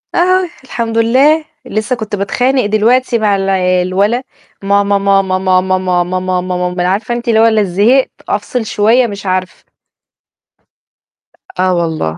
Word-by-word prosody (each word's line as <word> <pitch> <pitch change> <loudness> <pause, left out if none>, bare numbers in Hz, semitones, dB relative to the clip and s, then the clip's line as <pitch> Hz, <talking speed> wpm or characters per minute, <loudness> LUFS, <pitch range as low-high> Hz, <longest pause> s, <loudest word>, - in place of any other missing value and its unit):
آه، 370 0 +2
الحمد 230 -3 -4
لله، 275 +7 +3 0.2
لسّه 215 +4 -2
كنت 215 -3 -5
باتخانق 250 +5 0
دلوقتي 235 +4 +2
مع 205 -2 +2
الع 195 0 0 0.3
الولا، 200 +7 0 0.4
ماما، 200 0 +2
ماما، 195 -1 +1
ماما، 185 -1 +2
ماما، 185 -1 0 0.2
ماما 185 0 -1 0.2
مام 180 0 -2
مان 180 - -1
عارفة 200 +6 -1
أنتِ 240 +1 -6
اللي 220 -1 +3
هو 225 - +5
ال 220 -2 +2
زهقت، 220 +9 +2 0.2
أفصل 220 +3 -2
شوية 225 +4 +2
مش 200 -1 -8
عارفة. 185 0 -3 2.0
آه 185 0 +2
والله، 160 - -2
205 Hz, 145 wpm, -13 LUFS, 185-240 Hz, 2.0 s, هو